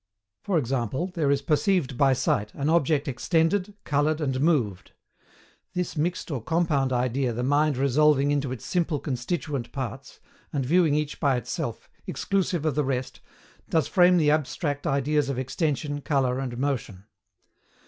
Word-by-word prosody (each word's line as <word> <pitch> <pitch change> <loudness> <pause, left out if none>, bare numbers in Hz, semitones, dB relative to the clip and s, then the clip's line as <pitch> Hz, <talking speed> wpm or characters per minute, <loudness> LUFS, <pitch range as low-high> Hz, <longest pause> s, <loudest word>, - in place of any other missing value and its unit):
For 195 -4 0
example, 135 - -1
there 160 -6 0
is 140 0 +1
perceived 155 -2 +1
by 135 +1 +4
sight 105 -5 0
an 140 +2 -1
object 155 -3 +2
extended, 170 +9 0
coloured, 150 +2 +1
and 135 -4 -1
moved: 130 - 0 0.8
this 180 -1 -2
mixed 165 +2 -2
or 135 -5 -2
compound 150 -2 +1
idea 125 +1 0
the 120 +2 -3
mind 145 +1 +2
resolving 140 +1 +3
into 140 -2 0
its 130 -4 -6
simple, 170 -4 0
constituent 135 -1 -3
parts, 135 0 -6 0.3
and 140 -3 -1
viewing 160 +1 +3
each 150 -1 -2
by 140 -4 +2
itself, 125 - -4 0.2
exclusive 185 -5 -1
of 155 - +1
the 150 +2 +1
rest, 130 -1 -3 0.5
does 160 -2 +2
frame 180 -1 +5
the 150 -3 +4
abstract 145 0 -1
ideas 140 +1 +1
of 135 - -2
extension, 145 +2 -2
colour, 135 -3 0
and 125 -3 -4
motion. 125 -8 -3
145 Hz, 150 wpm, -26 LUFS, 130-160 Hz, 0.8 s, frame